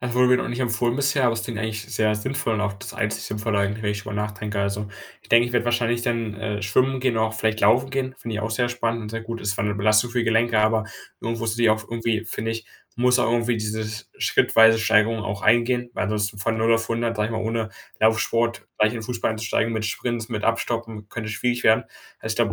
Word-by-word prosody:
Das 125 Hz, -1 st, -3 dB
wurde 125 Hz, 0 st, +4 dB
mir 125 Hz, -, +6 dB
noch -, -, -2 dB
nicht 120 Hz, +2 st, -4 dB
empfohlen 120 Hz, 0 st, +1 dB
bisher, 140 Hz, 0 st, +1 dB
aber 120 Hz, -, +4 dB
es 115 Hz, 0 st, -3 dB
klingt 115 Hz, -1 st, -5 dB
eigentlich 110 Hz, -1 st, -3 dB
sehr 110 Hz, -2 st, 0 dB
sinnvoll 130 Hz, +2 st, -2 dB
und 105 Hz, -, -1 dB
auch 100 Hz, -1 st, -1 dB
das 100 Hz, -, -9 dB
einzigste -, -, -2 dB
Sinnvolle 105 Hz, 0 st, -1 dB
eigentlich, 100 Hz, +2 st, -1 dB
wenn 105 Hz, -, 0 dB
ich 105 Hz, 0 st, -5 dB
drüber 105 Hz, -, -6 dB
nachdenke. 105 Hz, 0 st, -3 dB
Also, 100 Hz, +1 st, -2 dB, 0.3 s
ich -, -, -21 dB
denke, 120 Hz, +1 st, +6 dB
ich 120 Hz, -, -6 dB
werde 120 Hz, -1 st, +2 dB
wahrscheinlich 120 Hz, 0 st, +1 dB
dann, 115 Hz, -3 st, -1 dB
äh, 105 Hz, -1 st, -4 dB
Schwimmen 130 Hz, +7 st, +2 dB
gehen, 125 Hz, -2 st, +1 dB
auch 110 Hz, 0 st, +1 dB
vielleicht 110 Hz, -1 st, -1 dB
Laufen 125 Hz, +6 st, +4 dB
gehen, 135 Hz, -1 st, -2 dB
finde 115 Hz, -3 st, -5 dB
ich -, -, -2 dB
auch 110 Hz, -, -2 dB
sehr 120 Hz, +2 st, +1 dB
spannend 115 Hz, -1 st, -1 dB
und 105 Hz, -, -6 dB
sehr 115 Hz, 0 st, -4 dB
gut. 115 Hz, +1 st, -6 dB
Es 105 Hz, -, -3 dB
ist 100 Hz, -, +1 dB
zwar 100 Hz, -, -2 dB
'ne 105 Hz, -1 st, 0 dB
Belastung 105 Hz, +3 st, +3 dB
für 125 Hz, -, -1 dB
die 120 Hz, -, +1 dB
Gelenke, 115 Hz, 0 st, +3 dB
aber 110 Hz, 0 st, +3 dB, 0.4 s
irgendwo 115 Hz, 0 st, -3 dB
sehe 115 Hz, +1 st, 0 dB
ich 110 Hz, -, +6 dB
auch 110 Hz, 0 st, +1 dB
irgendwie, 115 Hz, -1 st, -1 dB
finde 115 Hz, +1 st, -3 dB
ich, 115 Hz, 0 st, -5 dB, 0.3 s
muss 125 Hz, +1 st, +3 dB
auch 120 Hz, -, +2 dB
irgendwie 120 Hz, 0 st, +1 dB
diese 110 Hz, 0 st, -2 dB, 0.3 s
schrittweise 115 Hz, 0 st, +5 dB
Steigerung 110 Hz, +1 st, +3 dB
auch 100 Hz, -1 st, -4 dB
eingehen, 120 Hz, +2 st, +3 dB
weil -, -, -1 dB
das 105 Hz, -1 st, 0 dB
von 105 Hz, +2 st, -2 dB
0 115 Hz, +1 st, +4 dB
auf 115 Hz, 0 st, -1 dB
100, 115 Hz, 0 st, -1 dB
sage 105 Hz, 0 st, 0 dB
ich -, -, -5 dB
mal, 110 Hz, -, -2 dB
ohne 110 Hz, 0 st, -2 dB, 0.3 s
Laufsport 115 Hz, +1 st, +1 dB
gleich 110 Hz, 0 st, +4 dB
in 120 Hz, -, -4 dB
den -, -, -6 dB
Fußball 120 Hz, 0 st, -2 dB
einzusteigen 110 Hz, +1 st, -1 dB
mit 110 Hz, -1 st, -2 dB
Sprints, 115 Hz, 0 st, -3 dB
mit 110 Hz, -3 st, -3 dB
Abstoppen, 115 Hz, -2 st, -2 dB
könnte 110 Hz, -1 st, -5 dB
schwierig 120 Hz, +4 st, -1 dB
werden. 110 Hz, 0 st, +5 dB, 0.3 s
Also, 110 Hz, -, -3 dB
ich -, -, -5 dB
glaube, 115 Hz, -4 st, +2 dB
115 Hz, 255 wpm, -23 LUFS, 110-120 Hz, 0.4 s, mir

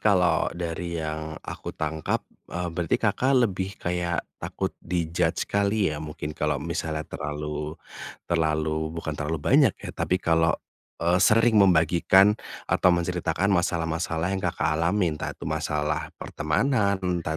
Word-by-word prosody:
kalau 90 Hz, -6 st, +3 dB
dari 85 Hz, 0 st, -3 dB
yang 80 Hz, 0 st, -4 dB
aku -, -, -7 dB
tangkap, 80 Hz, -1 st, -2 dB, 0.2 s
eee, 90 Hz, 0 st, -3 dB
berarti 85 Hz, -1 st, 0 dB
Kakak 130 Hz, -1 st, +3 dB
lebih 95 Hz, -2 st, -3 dB
kayak 85 Hz, 0 st, -2 dB, 0.2 s
takut -, -, -3 dB
di-judge 85 Hz, 0 st, 0 dB
kali 100 Hz, -3 st, +1 dB
ya? 75 Hz, -, -5 dB
Mungkin 75 Hz, 0 st, -5 dB
kalau 75 Hz, -1 st, 0 dB
misalnya 80 Hz, 0 st, -3 dB
terlalu, 75 Hz, +1 st, -5 dB, 0.5 s
terlalu 80 Hz, -1 st, 0 dB
bukan 80 Hz, -2 st, -3 dB
terlalu 75 Hz, +2 st, -2 dB
banyak 70 Hz, -, +4 dB
ya -, -, -7 dB
tapi 90 Hz, -, 0 dB
kalau, 80 Hz, -2 st, +2 dB, 0.4 s
eee, 85 Hz, +2 st, +2 dB
sering 115 Hz, +1 st, +5 dB
membagikan 95 Hz, +2 st, +5 dB, 0.3 s
atau -, -, +3 dB
menceritakan 90 Hz, +2 st, +1 dB
masalah-masalah 85 Hz, 0 st, 0 dB
yang 95 Hz, -, -1 dB
Kakak -, -, 0 dB
alamin 85 Hz, -3 st, +1 dB
entah -, -, -4 dB
itu -, -, -9 dB
masalah 75 Hz, +1 st, -1 dB
pertemanan 100 Hz, -, +1 dB
entah 85 Hz, -3 st, -1 dB
85 Hz, 135 wpm, -26 LUFS, 80-90 Hz, 0.5 s, sering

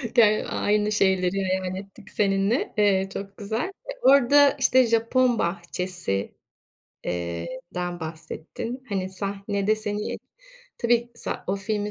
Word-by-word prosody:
Ger 215 Hz, -3 st, +5 dB
aynı 210 Hz, 0 st, +1 dB
şeyleri 190 Hz, -1 st, +2 dB
hayal 185 Hz, 0 st, -1 dB
ettik 195 Hz, +2 st, -10 dB
seninle. 195 Hz, +3 st, +1 dB
Eee, 195 Hz, -2 st, +3 dB
çok 195 Hz, 0 st, -7 dB
güzel. 220 Hz, +3 st, -2 dB
E, 390 Hz, +6 st, -9 dB
orada, 280 Hz, -, +6 dB
işte, 255 Hz, -1 st, +5 dB
Japon 230 Hz, +2 st, +2 dB
bahçesi, 175 Hz, -, -2 dB, 0.7 s
eee, 85 Hz, -1 st, -3 dB, 0.3 s
den 175 Hz, -1 st, -3 dB
bahsettin, 160 Hz, +10 st, -6 dB
hani, 190 Hz, -2 st, -2 dB
sahnede 200 Hz, +2 st, -1 dB
seni 210 Hz, -1 st, -3 dB, 0.6 s
Tabii, 240 Hz, 0 st, +2 dB
sa 235 Hz, -, -5 dB
o 195 Hz, +2 st, 0 dB
filmin 210 Hz, +1 st, -2 dB
200 Hz, 120 wpm, -25 LUFS, 185-225 Hz, 0.7 s, orada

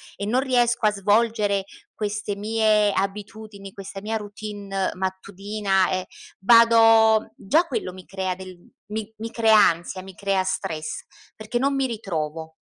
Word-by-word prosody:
e 200 Hz, -, -5 dB
non 240 Hz, +5 st, +1 dB
riesco 240 Hz, -3 st, +1 dB
a 210 Hz, -, +5 dB
svolgere 205 Hz, -1 st, +1 dB, 0.3 s
queste 210 Hz, -1 st, -3 dB
mie 215 Hz, -1 st, +2 dB
abitudini, 200 Hz, 0 st, -5 dB
questa 195 Hz, 0 st, -8 dB
mia 220 Hz, +2 st, -3 dB
routine 205 Hz, -2 st, -4 dB
mattutina, 195 Hz, +1 st, -1 dB
e 185 Hz, 0 st, -1 dB, 0.4 s
vado 225 Hz, 0 st, +6 dB
già 305 Hz, -, +2 dB
quello 245 Hz, -, -4 dB
mi 185 Hz, -1 st, -12 dB
crea 190 Hz, -1 st, -3 dB
del 185 Hz, -1 st, -10 dB, 0.4 s
mi 220 Hz, 0 st, -4 dB
mi 225 Hz, +1 st, -6 dB
crea 225 Hz, -2 st, +4 dB
ansia, 180 Hz, -1 st, +2 dB
mi 190 Hz, -, -11 dB
crea 195 Hz, -2 st, 0 dB
stress, 155 Hz, -4 st, -4 dB, 0.3 s
perché 215 Hz, +3 st, -4 dB
non 275 Hz, +2 st, +1 dB
mi 270 Hz, -1 st, +1 dB
ritrovo. 160 Hz, -8 st, -5 dB
205 Hz, 140 wpm, -23 LUFS, 190-220 Hz, 0.4 s, vado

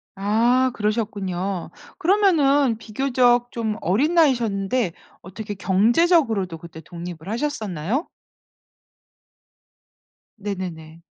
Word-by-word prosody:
아 235 Hz, +6 st, +2 dB
그러셨군요. 200 Hz, -4 st, -2 dB, 0.3 s
그러면은 315 Hz, -, +3 dB
비교적 245 Hz, +2 st, +1 dB
좀 220 Hz, -2 st, -3 dB
어린 270 Hz, -, +1 dB
나이셨는데 235 Hz, -, +2 dB, 0.3 s
어떻게 205 Hz, +3 st, -7 dB
경제적으로도 215 Hz, -, +2 dB
그때 160 Hz, -1 st, -11 dB
독립을 170 Hz, +1 st, -9 dB
하셨었나요? 220 Hz, -, -2 dB, 2.3 s
네네네. 175 Hz, -6 st, -6 dB
215 Hz, 230 characters per minute, -22 LUFS, 190-255 Hz, 2.3 s, 그러면은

